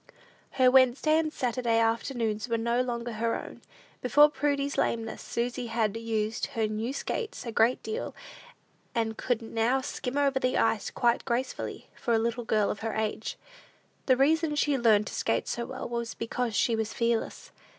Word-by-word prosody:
Her 255 -1 +5
Wednesday 265 +4 +4
and 315 -1 -1
Saturday 240 -4 0
after 230 +4 +1
noons 220 -1 -2
were 230 - +1
no 235 +2 +1
longer 240 -1 -3
her 230 +1 -1
own. - - -10 0.4
Before 295 +4 +6
Prudy's 285 -1 0
lameness, 225 -1 -1
Susy 245 +1 -3
had 225 -2 0
used 225 -1 -2
her 220 - +2
new 215 +3 -2
skates 450 - -4
a 230 - -3
great 230 +3 +2
deal, 445 +3 -4 0.8
and 225 -1 0
could 245 -1 -1
now 230 +4 +1
skim 260 -1 -4
over 280 -2 +2
the 255 0 +1
ice 225 -2 +1
quite 240 -2 +1
gracefully, 250 +1 -3
for 235 - 0
a - - +4
little 235 +1 -1
girl 215 -2 +2
of 205 - -5
her 225 0 -3
age. 220 0 -2 0.7
The 255 -2 +5
reason 310 +3 +3
she 290 -1 +2
learned 220 -5 +4
to - - -7
skate - - 0
so 235 0 -3
well, 260 0 -5
was 235 -1 -4
because 230 0 -2
she 230 - +2
was 220 0 -3
fearless. 235 -1 -1
235 Hz, 175 wpm, -28 LUFS, 225-260 Hz, 0.8 s, Before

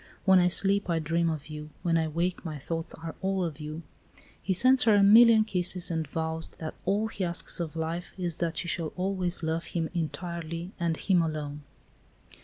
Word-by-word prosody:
When 190 -1 +6
I 180 - +4
sleep 195 +2 +3
I 170 - +1
dream 165 +1 0
of 155 -3 -4
you; 150 0 -8
when 170 -1 +1
I 160 -1 +1
wake 170 +3 -2
my 155 -4 -5
thoughts 165 +4 -5
are 165 0 -7
all 190 -1 0
of 165 -3 -4
you." 155 +2 -7 0.6
He 190 - -2
sends 255 +7 +6
her 220 -2 +5
a 200 - +5
million 220 +2 +7
kisses, 180 -4 -1
and 160 -2 -2
vows 160 +2 -3
that 160 -1 -6
all 210 +3 +1
he 200 - -4
asks 170 0 +1
of 165 -2 -4
life 165 +2 -4
is 175 -3 -1
that 170 -1 -2
she 175 - -2
shall 165 -2 -3
always 185 -2 -1
love 160 +1 -1
him 165 -2 -2
entirely 170 0 -4
and 170 -2 0
him 185 -3 +2
alone. 150 -2 -4
170 Hz, 200 wpm, -28 LUFS, 160-185 Hz, 0.6 s, million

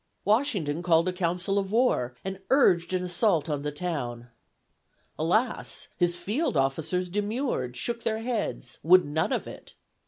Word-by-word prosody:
Washington 205 - +1
called 170 -1 +3
a 185 - 0
council 180 +2 0
of 195 -1 -4
war 215 - +2
and 190 0 -4
urged 185 -11 +4
an 185 -1 0
assault 175 -3 +1
on 145 -3 -2
the 150 0 -3
town. 130 -8 -4 0.9
Alas! 215 +10 0
his 175 -1 +1
field 215 - -1
officers 160 +7 0
demurred, 205 - -2
shook 235 - -2
their 220 -1 -1
heads, 225 -1 -3
would 180 +3 +6
none 150 +2 -1
of - - -1
it. - - -11
180 Hz, 150 wpm, -27 LUFS, 155-210 Hz, 0.9 s, would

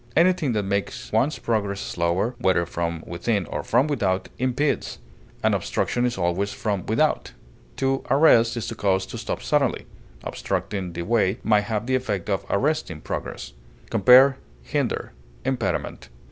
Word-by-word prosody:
Anything 170 -6 +3
that 105 -2 0
makes 100 +1 -3
one's 150 +4 +2
progress 100 -4 -1
slower, 85 +8 -1
whether 95 -6 +2
from 85 -1 -3
within 90 +3 -1
or - - -4
from 125 +4 +2
without, 100 -11 -1
impedes; 130 +3 0 0.5
an - - +3
obstruction 125 0 0
is 120 - -3
always 95 +3 0
from 100 -4 -3
without. 150 +8 +1 0.4
To 135 0 0
arrest 120 -5 +5
is 115 - -3
to - - -4
cause 95 -2 +1
to - - -7
stop - - -4
suddenly; - - +1 0.4
obstructing 95 -4 -3
the 85 0 -4
way 105 0 +2
may 105 -1 +4
have 105 +1 -3
the 130 - -1
effect 105 -7 -1
of 95 - -1
arresting 125 - 0
progress. - - -5 0.4
Compare 130 +6 +7 0.3
HINDER; - - -2 0.3
IMPEDIMENT. 130 -3 -2
105 Hz, 145 wpm, -24 LUFS, 95-130 Hz, 0.5 s, Compare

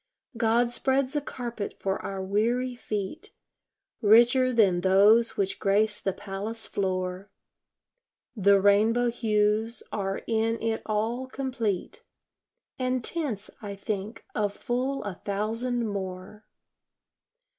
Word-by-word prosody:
God 230 +1 +2
spreads 265 +2 0
a 295 - +1
carpet 240 -6 -5
for 195 0 -2
our 195 -1 -4
weary 235 +6 0
feet, 240 - -5 0.7
Richer 240 +4 +5
than 195 -7 +3
those 205 +5 +5
which 195 -1 -1
grace 210 +1 +2
the 195 - 0
palace 205 +3 -5
floor; 185 0 -3 1.1
The 200 -2 +5
rainbow 220 +5 +3
hues 220 0 +1
are 195 -1 -3
in 225 0 0
it 225 -1 -1
all 225 +4 -1
complete, 260 - -3 0.8
And 255 -1 0
tints, 250 - -3
I 205 -2 -6
think, 200 +2 -5
of 205 -1 0
full 255 +5 -2
a 205 -2 -4
thousand 230 +4 -1
more. 190 +1 -6
220 Hz, 115 wpm, -27 LUFS, 200-240 Hz, 1.1 s, Richer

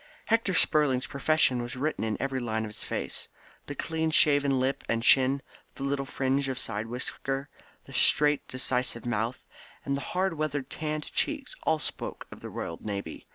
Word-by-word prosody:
Hector 225 -5 +2
Spurling's 140 -6 +3
profession 140 -3 +2
was 120 +2 -5
written 145 +2 -1
in 110 -1 -1
every 135 -1 -1
line 110 -2 -1
of 105 - -6
his - - -9
face. - - -4 0.4
The 145 - -5
clean 160 +2 -1
shaven 145 -3 +4
lip 130 +1 0
and 115 0 +1
chin, 135 +2 +5 0.3
the 135 - -6
little 140 0 -1
fringe 135 0 0
of 130 -1 -2
side 105 -1 -3
whisker, 135 +3 -3 0.4
the - - -12
straight 150 -1 +5
decisive 125 -2 -1
mouth, 120 +2 -1 0.4
and 140 - 0
the 140 - -3
hard 185 +3 0
weather 150 -3 -1
tanned 150 +2 -4
cheeks 290 -4 -1
all 160 - +4
spoke 150 - -6
of - - -10
the - - -7
Royal 85 - -5
Navy. 100 -6 -5
135 Hz, 175 wpm, -29 LUFS, 125-150 Hz, 0.4 s, chin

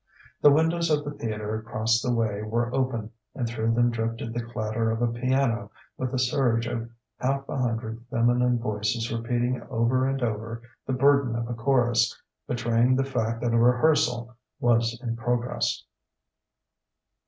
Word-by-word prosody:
The 145 - +8
windows 165 +3 +2
of 150 -1 +1
the 145 - -3
theatre 110 -5 -4
across 110 +1 0
the 125 - 0
way 110 -3 0
were 120 +3 -1
open, 120 -5 -1 0.2
and 120 - -1
through 115 0 0
them 120 0 +3
drifted 115 0 -3
the 120 - -2
clatter 115 -1 -2
of 110 0 -1
a 120 -1 +1
piano 125 -1 0 0.3
with 130 -1 -3
the 130 - -1
surge 125 -2 +2
of 115 0 -4 0.3
half 135 +1 -1
a - - -4
hundred 115 -2 -2
feminine 125 0 +2
voices 110 0 -2
repeating 120 +2 -1
over 130 +2 +2
and 135 -1 -2
over 115 +1 -3 0.2
the 130 - 0
burden 140 -2 +3
of 115 0 -2
a 120 - -3
chorus 120 -2 +2 0.3
betraying 120 +1 +2
the 135 - +2
fact 115 -3 -2
that 120 -1 0
a 115 - +4
rehearsal 120 -1 +3 0.2
was 115 -1 +2
in 115 -2 -2
progress. 120 +1 -1
120 Hz, 160 wpm, -26 LUFS, 115-125 Hz, 0.3 s, The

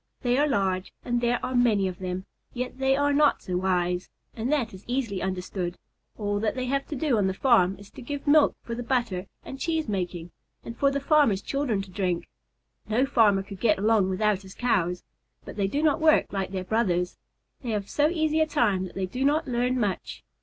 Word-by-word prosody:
They 245 -1 +2
are 295 - +3
large 190 -7 0
and 240 -1 0
there 240 0 +1
are 255 - -3
many 225 -6 +3
of 180 -1 -6
them, 185 0 -4 0.3
yet 250 +1 -4
they 265 0 +3
are 285 +1 +2
not 295 +1 +3
so 180 - -3
wise, 180 -1 0 0.3
and 235 +4 -2
that 275 -9 0
is 190 +1 -11
easily 240 -6 -2
understood. 185 -1 -3 0.4
All 205 -1 -1
that 215 +3 -1
they 255 -1 -2
have 275 +2 -1
to 300 - -5
do 270 -5 +1
on 195 - +2
the 190 - -1
farm 195 -7 +4
is 200 +1 -14
to - - -11
give 280 +3 -5
milk 295 0 +5
for 235 - -5
the 240 - -4
butter 235 -7 -1 0.2
and 270 - -8
cheese 320 -2 -1
making, 175 -4 -3 0.3
and 230 - -7
for 275 +3 +3
the 280 0 -1
farmer's 280 -9 +3
children 255 -8 -1
to 190 - -13
drink. 180 -3 -1 0.6
No 240 +5 +3
farmer 215 -7 +3
could 195 -1 -10
get 215 -1 +3
along 210 -1 +3
without 200 +1 +1
his 190 -1 -13
Cows, 180 -8 0 0.4
but - - -8
they 200 -2 0
do 285 +9 -1
not 310 0 +2
work 310 -7 +4
like 195 -2 -2
their 190 -1 -4
brothers. 180 -4 0 0.4
They 245 - -5
have 205 -3 -2
so 295 +6 +2
easy 315 -2 +1
a 315 - +3
time 205 -10 +1
that 185 - -10
they 190 - -1
do 250 +8 -3
not 295 +3 +2
learn 250 +1 0
much. 205 -5 -3
220 Hz, 215 wpm, -26 LUFS, 190-265 Hz, 0.6 s, milk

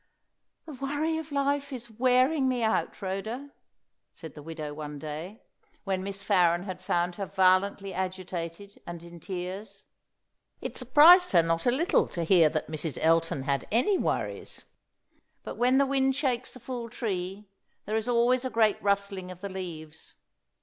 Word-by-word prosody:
"The 315 - -8
worry 290 +4 -1
of 320 -1 -9
life 280 0 0
is 240 -3 -7
wearing 255 +4 +3
me 250 -2 0
out, 220 0 0
Rhoda," 220 +9 -4 0.6
said 160 -4 -11
the 150 - -10
widow 155 -1 -6
one 150 -1 -7
day, 155 +8 -7 0.4
when 190 -2 -2
Miss 195 0 -5
Farren 175 -4 +3
had 185 -2 -6
found 175 -1 -1
her 195 -2 -3
violently 190 +1 +2
agitated, 185 0 -5
and 170 -1 -7
in 170 0 -11
tears. 195 +3 -6 0.7
It - - -6
surprised 305 - +7
her 170 -2 +6
not 165 +5 0
a - - +5
little 335 +10 +2
to 170 - -4
hear 165 -2 +5
that 155 0 -2
Mrs. 155 -1 -3
Elton 165 -3 +2
had 140 0 -1
any 255 - +3
worries. - - -3 0.8
But - - -7
when 250 +2 +3
the 280 - +4
wind 270 -1 +1
shakes 255 -4 -1
the - - -10
full 240 -1 -6
tree, 195 -3 -4 0.4
there 215 - -2
is 220 +1 -1
always 245 +1 +3
a 260 - -2
great 220 -3 +2
rustling 200 -2 -1
of 180 -1 -10
the 200 - -4
leaves. 160 -5 -8
200 Hz, 165 wpm, -28 LUFS, 175-255 Hz, 0.8 s, surprised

